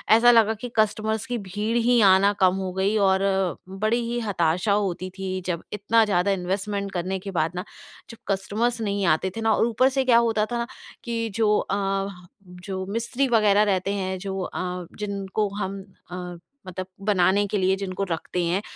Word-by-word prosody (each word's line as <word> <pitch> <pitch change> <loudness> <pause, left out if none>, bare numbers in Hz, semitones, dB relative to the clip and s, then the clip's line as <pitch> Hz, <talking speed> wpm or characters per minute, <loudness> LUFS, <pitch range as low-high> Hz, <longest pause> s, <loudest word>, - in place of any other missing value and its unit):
ऐसा 240 +1 +6
लगा 225 -2 +5
कि 245 +3 -7
कस्टमर्स 215 0 +1
की 245 -1 -2
भीड़ 210 +5 -1
ही 240 +1 +3
आना 195 +2 +5
कम 185 0 +4
हो 190 -1 -3
गई 190 +3 +1
और 190 0 +3 0.5
बड़ी 215 +5 0
ही 240 - -1
हताशा 185 -2 0
होती 185 -2 -1
थी, 185 -1 -3
जब 170 -2 -2
इतना 210 +2 +3
ज़्यादा 195 -1 +1
इन्वेस्टमेंट 195 +2 -2
करने 185 +1 -2
के 195 +1 -7
बाद 160 +1 +1
ना 180 - -3 0.5
जब 230 - -10 0.2
कस्टमर्स 230 +5 -1
नहीं 200 -2 -1
आते 190 - -3
थे - - -3
ना 225 -1 +3
और - - +2
ऊपर 255 +3 +3
से 270 - +4
क्या 240 -2 +5
होता 215 -1 +1
था 240 - -1
ना 235 0 -2 0.4
कि 230 -1 -2
जो 215 -2 +3
अ, 195 0 -1 0.4
जो 185 +1 -6
मिस्त्री 235 +6 -1
वगैरह 210 -3 +4
रहते 195 -1 0
हैं, 190 -1 -2
जो 195 0 -4
अ, 180 -1 -4
जिनको 200 0 -2
हम 195 -1 -4 0.3
अ, - - -5 0.5
मतलब 185 +1 -5 0.2
बनाने 200 0 +3
के 210 +1 -1
लिए 190 0 +2
जिनको 195 0 -4
रखते 175 +2 -2
हैं, 180 +4 0
200 Hz, 185 wpm, -24 LUFS, 190-220 Hz, 0.5 s, ऐसा